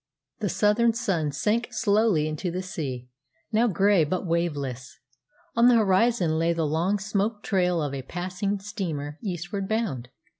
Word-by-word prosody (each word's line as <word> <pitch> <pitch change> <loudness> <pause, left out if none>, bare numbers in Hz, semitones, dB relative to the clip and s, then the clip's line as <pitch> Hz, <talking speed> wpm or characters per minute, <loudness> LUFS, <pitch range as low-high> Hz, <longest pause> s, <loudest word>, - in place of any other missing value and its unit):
The 210 -3 -1
southern 220 +5 +3
sun 190 -10 -1
sank 210 +12 0
slowly 205 -7 +2
into 155 +4 -3
the 180 +2 -3
sea, 135 -9 -5 0.4
now 225 +3 +3
grey 195 -3 +3
but 180 +5 -2
waveless. 145 -7 -2 0.6
On 235 +1 +5
the 250 - +6
horizon 195 -5 +3
lay 165 +1 +2
the 165 -1 -1
long 165 +7 +1
smoke 205 +2 -2
trail 180 -3 +1
of 145 -2 -3
a 135 - -3
passing 185 +7 -3
steamer 160 -7 -5
eastward 190 0 -4
bound. 190 - -2
185 Hz, 150 wpm, -26 LUFS, 155-210 Hz, 0.6 s, the